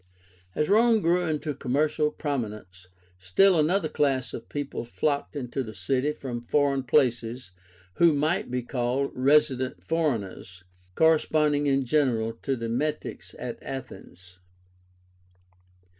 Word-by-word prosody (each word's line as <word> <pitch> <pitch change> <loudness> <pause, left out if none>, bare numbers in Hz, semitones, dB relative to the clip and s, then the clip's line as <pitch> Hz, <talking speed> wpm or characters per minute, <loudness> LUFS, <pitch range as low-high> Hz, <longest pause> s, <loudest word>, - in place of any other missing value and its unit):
As 150 - +1
Rome 225 +2 +4
grew 175 +1 +2
into 155 -1 -2
commercial 150 +3 0
prominence, 105 - -5 0.3
still 170 - +4
another 160 +3 +2
class 140 -4 0
of 115 - -8
people 145 -4 -4
flocked 140 +4 -2
into 135 -1 -3
the 110 -4 -7
city 130 +10 0
from 125 -5 -6
foreign 140 +2 +1
places, 120 -4 0 0.5
who 170 -1 +6
might 155 +2 0
be 125 0 -2
called 125 +2 -1
resident 130 -1 +2
foreigners, 110 - -2 0.3
corresponding 150 -2 +3
in 135 -1 +2
general 120 -5 +1
to 135 - -1
the 115 -2 -4
Metics 140 +7 -3
at - - -6
Athens. 90 -9 -9
135 Hz, 120 wpm, -26 LUFS, 120-150 Hz, 0.5 s, who